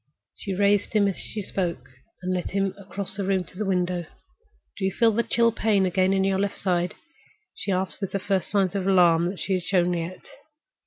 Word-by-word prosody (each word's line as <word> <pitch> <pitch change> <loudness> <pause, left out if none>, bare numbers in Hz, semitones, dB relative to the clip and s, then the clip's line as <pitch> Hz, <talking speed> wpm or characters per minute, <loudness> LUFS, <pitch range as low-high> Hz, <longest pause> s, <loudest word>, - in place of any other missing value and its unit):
She 195 -2 -4
raised 205 +2 +2
him 205 -2 +4
as 195 - -1
she 210 - -5
spoke, 170 -10 -3 0.4
and 185 0 -1
led 180 -1 -2
him 195 0 0
across 200 -1 -4
the 200 - -2
room 190 -1 +1
to 180 - -17
the 210 +1 -3
window. 180 -2 0 0.7
"Do - - -6
you 190 - +2
feel 230 +3 +3
the 225 +2 +1
chill 230 0 +2
pain 210 -3 +2
again 185 +1 +2
on 190 - +2
your 195 0 +1
left 200 0 -1
side?" 180 -2 0 0.6
she 200 - -4
asked, 185 -1 -2
with 195 - -3
the - - 0
first 195 -2 -1
signs 195 -3 +1
of 195 -2 -2
alarm 175 -3 +5
that 185 +1 -5
she 195 - -1
had 185 - +1
shown 180 -2 +2
yet. 170 +2 -5
190 Hz, 215 wpm, -25 LUFS, 180-200 Hz, 0.7 s, alarm